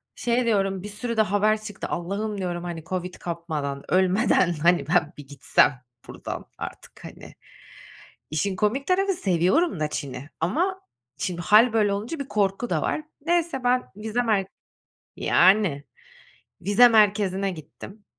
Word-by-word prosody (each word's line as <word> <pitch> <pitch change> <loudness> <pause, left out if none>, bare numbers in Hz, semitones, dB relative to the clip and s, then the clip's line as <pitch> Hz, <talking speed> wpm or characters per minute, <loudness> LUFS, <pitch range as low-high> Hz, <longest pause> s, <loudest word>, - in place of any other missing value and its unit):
Şey 240 +1 0
diyorum, 195 -4 0
bir 210 - -6
sürü 230 +2 -5
de - - +5
haber 215 +1 +1
çıktı 210 -2 -7
Allah'ım 200 +4 -3
diyorum, 175 -2 -3
hani, 170 -2 -6
COVID 180 +2 -4
kapmadan, 155 -6 -5
ölmeden, 185 -1 +3
hani, 165 -2 +2
ben 165 -2 +1
bir 145 - -11
gitsem 140 -2 +2 0.3
buradan - - -7
artık, - - -9
hani. - - -12 1.0
İşin 190 +5 -1
komik 250 +9 0
tarafı 390 +2 +2
seviyorum 190 - +1
da 150 - -1
Çin'i 140 -1 -6
ama 355 - -1 0.4
şimdi 175 +5 -3
hâl 220 +5 +5
böyle 210 -3 +2
olunca 225 +11 -4
bir 280 - -5
korku 205 +2 -1
da - - 0
var. 310 - -2 0.2
Neyse 335 -5 0
ben 250 0 +2
vize 220 +3 -2
merk 200 -4 +1 0.7
yani, 185 -6 +3 0.8
vize 205 +5 +6
merkezine 200 -3 +2
gittim. 190 +5 -11
200 Hz, 140 wpm, -24 LUFS, 175-225 Hz, 1.0 s, vize